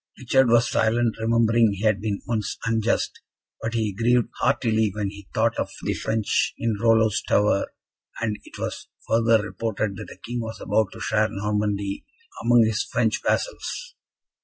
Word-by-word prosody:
Richard 130 0 +3
was 120 0 +4
silent, 115 0 +1
remembering 115 -1 +3
he 100 +2 -6
had 105 -3 +2
been 105 -2 -3
once 110 -3 -2
unjust, 115 -1 0 0.4
but 115 +1 -3
he 110 -3 0
grieved 120 +3 +2
heartily 110 -5 +2
when 105 -2 -2
he 100 -1 -12
thought 115 0 +1
of - - -1
the - - 0
French 110 -1 0
in 115 -2 0
Rollo's 110 -2 +3
tower, 105 -1 +1 0.5
and 110 -2 -2
it - - -13
was - - -5 0.2
further 115 -1 +3
reported 105 -2 -3
that - - -7
the - - -11
King 120 +1 -3
was 110 0 -6
about 110 -3 +1
to - - -10
share 110 0 +1
Normandy 105 -1 -2 0.4
among 120 -1 +5
his 110 0 0
French 115 -3 0
vassals. - - -2
110 Hz, 160 wpm, -24 LUFS, 105-115 Hz, 0.5 s, among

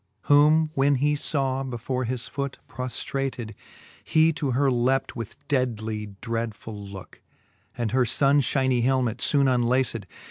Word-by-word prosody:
Whom 155 +2 +4
when 140 0 +3
he 145 +3 +2
faw 135 -2 0
before 130 0 -3
his 125 0 -4
foote 140 -1 -4
proftrated,. 125 -1 -4 0.5
He 160 +1 +3
to 150 -3 -2
her 135 +2 +2
lept 130 +2 +1
with 115 -2 -8
deadly 110 -6 -2
dreadfuli 110 -3 -5
looke. 95 -2 -11 0.6
And 115 -3 -1
her 130 0 +3
funfhynie 135 -1 +2
helmet 125 -2 +1
foone 140 -2 +3
unlaced. 120 -4 +1
130 Hz, 130 wpm, -25 LUFS, 115-140 Hz, 0.6 s, Whom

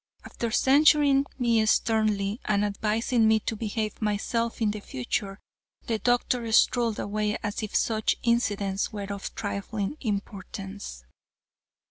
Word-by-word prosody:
After 235 - -4
censuring 280 +2 +4
me 235 -3 +2
sternly 215 -1 +1
and 210 -1 +2
advising 220 +3 +1
me 220 0 +4
to 225 - -3
behave 215 0 -3
myself 225 +2 -1
in 215 -3 +2
the 210 - -5
future, 195 - -4 0.5
the 225 -2 -1
doctor 245 -1 +1
strolled 235 -1 +3
away 210 +1 -1
as 205 0 -3
if 215 -2 -5
such 220 -1 +1
incidents 205 -5 0
were 200 -1 -5
of 200 - -7
trifling 205 +3 -3
importance. 200 - -5
215 Hz, 125 wpm, -27 LUFS, 205-235 Hz, 0.5 s, censuring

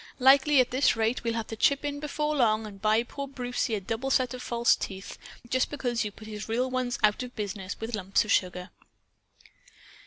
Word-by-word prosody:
Likely, 275 +2 +6
at 255 - +3
this 260 +1 +3
rate, 225 +2 0
we'll 230 -1 -1
have 225 -1 -2
to 225 - -7
chip 280 +6 +2
in 285 0 -3
before 300 +1 -2
long 220 -5 +2
and 200 -2 -10
buy 215 +2 +3
poor 280 +3 -6
Brucie 245 -4 -2
a - - -2
double 225 +7 -3
set 255 -2 +2
of 250 - -7
false 235 -1 +2
teeth. 195 0 -7 0.3
Just 255 +2 +1
because 245 -5 -1
you've 210 -1 -6
put 215 - -12
his 210 0 -7
real 250 +3 0
ones 255 -1 -1
out 210 +2 +3
of 250 0 -7
business 200 -2 -5
with 225 +2 -5
lumps 195 +1 +1
of 205 - -3
sugar!" 180 0 0
235 Hz, 210 wpm, -28 LUFS, 215-260 Hz, 0.3 s, Likely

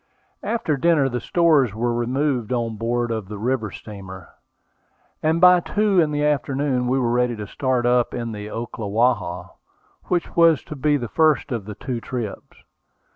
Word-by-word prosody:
After 165 -11 -1
dinner 150 -2 +3
the 125 -1 -3
stores 150 - +2
were 120 +2 0
removed 125 0 -1
on 115 -3 -1
board 120 +2 -1
of 110 -4 -3
the 105 +1 -7
river 115 0 -1
steamer, 95 -4 -10 0.9
and 160 +2 +1
by 180 0 +7
two 205 +1 +1
in 155 - +1
the 150 0 0
afternoon 140 -3 0
we 130 +2 +1
were 120 -3 +1
ready 125 0 +1
to 105 -1 -6
start 130 +3 -1
up 120 0 +3
the - - -6 0.3
Ocklawaha, 110 -4 -1 0.5
which 175 -1 -2
was 165 -7 +5
to 150 - -8
be 145 +2 +1
the 120 -4 -4
first 155 +1 +2
of 115 -5 -3
the 105 0 -7
two 125 -1 -5
trips. 120 -5 -6
125 Hz, 165 wpm, -22 LUFS, 115-150 Hz, 0.9 s, by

